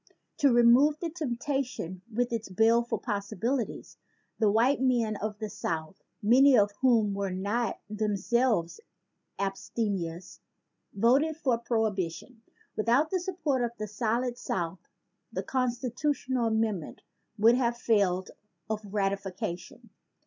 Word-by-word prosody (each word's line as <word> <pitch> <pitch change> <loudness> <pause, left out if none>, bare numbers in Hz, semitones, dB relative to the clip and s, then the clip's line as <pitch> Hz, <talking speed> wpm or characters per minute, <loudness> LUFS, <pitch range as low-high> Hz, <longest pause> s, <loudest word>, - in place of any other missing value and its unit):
To 280 -3 +4
remove 240 +5 +5
the 335 -2 -3
temptation 255 - -3
with 240 +2 -1
its 225 -3 -3
baleful 230 +5 +2
possibilities, 220 +3 -3 0.4
the 215 -2 +4
white 240 +7 +3
men 240 -4 +2
of 210 0 -4
the 215 0 -4
South, 165 -2 -4 0.2
many 260 +5 +6
of 205 -1 +4
whom 230 -6 +3
were 200 0 -2
not 200 +5 -2
themselves 210 -3 0 0.6
abstemious, 195 -3 -3 0.5
voted 270 +9 +2
for 255 -7 +1
Prohibi 220 -7 0
tion. 230 +7 -13 0.3
Without 240 +8 +2
the 375 - +1
support 330 -8 -1
of 235 0 -3
the 215 0 -4
solid 235 +4 -1
South 170 -5 -3 0.5
the - - -3
constitutional 255 0 -1
amendment 220 -7 -1 0.3
would 225 +3 +6
have 240 -1 +1
failed 195 -6 +1 0.4
of 215 0 -2
ratification. 195 -3 -4
225 Hz, 120 wpm, -29 LUFS, 200-250 Hz, 0.6 s, many